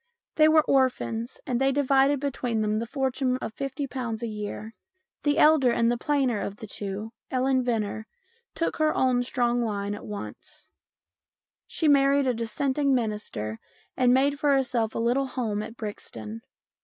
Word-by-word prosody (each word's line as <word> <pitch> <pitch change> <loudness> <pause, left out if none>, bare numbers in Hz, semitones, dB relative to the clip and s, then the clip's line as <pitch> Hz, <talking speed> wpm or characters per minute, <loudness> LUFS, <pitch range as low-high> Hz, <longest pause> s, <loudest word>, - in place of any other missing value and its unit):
They 310 0 +5
were 310 0 +5
orphans, 250 -4 0
and 250 -2 -1
they 270 0 +4
divided 275 0 +3
between 250 -5 -2
them 215 +1 0
a 230 - -4
fortune 260 -1 0
of 220 - -6
50 275 +2 -4
a 235 -3 -3
year. 215 0 -5 0.5
The 290 0 +1
elder 300 -5 +5
and 235 0 +2
plainer 270 -7 +1
of 200 - -4
the 220 - -9
two, 205 +1 -5 0.2
Ellen 260 0 +2
Venner, 220 -3 -2 0.5
took 330 - -1
her 310 0 +2
own 255 -1 +2
strong 245 -1 0
line 205 -3 -2
at 205 - -8
once. 210 -1 -8 1.0
She 320 - -1
married 280 -1 +4
a 255 - +2
Dissenting 265 +5 0
minister 210 - -3 0.4
and 250 -1 +3
made 280 +3 +3
for 290 -2 +3
herself 240 -4 0
a - - -1
little 245 +4 +1
home 225 -5 -2
at 225 +2 -8
Brixton. 115 - -7
245 Hz, 155 wpm, -26 LUFS, 220-275 Hz, 1.0 s, They